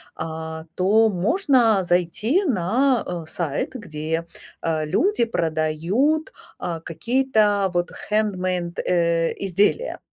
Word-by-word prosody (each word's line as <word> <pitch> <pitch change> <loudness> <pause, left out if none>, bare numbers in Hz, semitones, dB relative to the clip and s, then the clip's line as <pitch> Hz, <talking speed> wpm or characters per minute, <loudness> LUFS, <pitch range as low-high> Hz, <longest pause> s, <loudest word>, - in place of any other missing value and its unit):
а, 160 0 -6
то 215 +4 +4
можно 225 - +2
зайти 180 - +1
на, 245 - +1 0.2
э, - - -13
сайт, 155 -5 -2
где, 165 -7 -4 0.4
э, 160 -2 -1
люди 335 - +2
продают, 170 - 0 0.3
а, 170 -2 -3
какие-то 210 0 +1
вот 175 0 -1 0.2
хендмейд, 185 -5 -1
э, 170 -1 +1
изделия. 200 - 0
185 Hz, 100 wpm, -23 LUFS, 165-230 Hz, 0.4 s, то